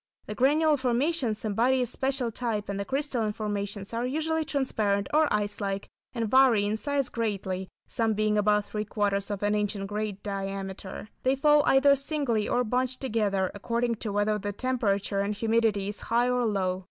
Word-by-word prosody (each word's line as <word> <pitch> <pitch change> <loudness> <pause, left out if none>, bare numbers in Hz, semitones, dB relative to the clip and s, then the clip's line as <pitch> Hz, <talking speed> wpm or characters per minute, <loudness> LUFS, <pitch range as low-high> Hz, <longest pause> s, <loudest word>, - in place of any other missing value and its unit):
The 210 - -5
granular 295 +6 +3
formations 255 -2 0
embody 235 +5 +2
a - - 0
special 260 0 -1
type, 220 -3 -3
and 200 0 -3
the 200 - -2
crystalline 260 -5 -1
formations 205 -1 -4
are 230 +1 -1
usually 315 +5 0
transparent 215 -9 0
or 310 0 +4
ice 210 0 -1
like, 195 0 -2 0.3
and 230 -2 -1
vary 245 -4 +5
in 210 +1 0
size 280 +3 -1
greatly, 195 -5 -3 0.2
some 225 -3 0
being 215 0 +1
about 210 0 +2
three 210 0 -3
quarters 200 -1 -1
of 205 -1 -4
an 205 0 +2
inch 210 0 0
in 195 -1 -4
greater 210 0 -3
diameter. 195 0 -5
They 260 +1 +2
fall 295 +2 +5
either 280 +1 +6
singly 275 -6 -1
or 250 - +2
bunched 255 +2 -1
together, 205 -7 0
according 235 +3 -1
to 215 -1 -4
whether 205 +1 +1
the 205 +1 -4
temperature 205 -5 0
and 200 +1 -1
humidity 220 -2 +1
is 210 - -5
high 240 +2 +1
or 250 -1 +1
low. 185 -3 0
215 Hz, 180 wpm, -27 LUFS, 205-255 Hz, 0.3 s, either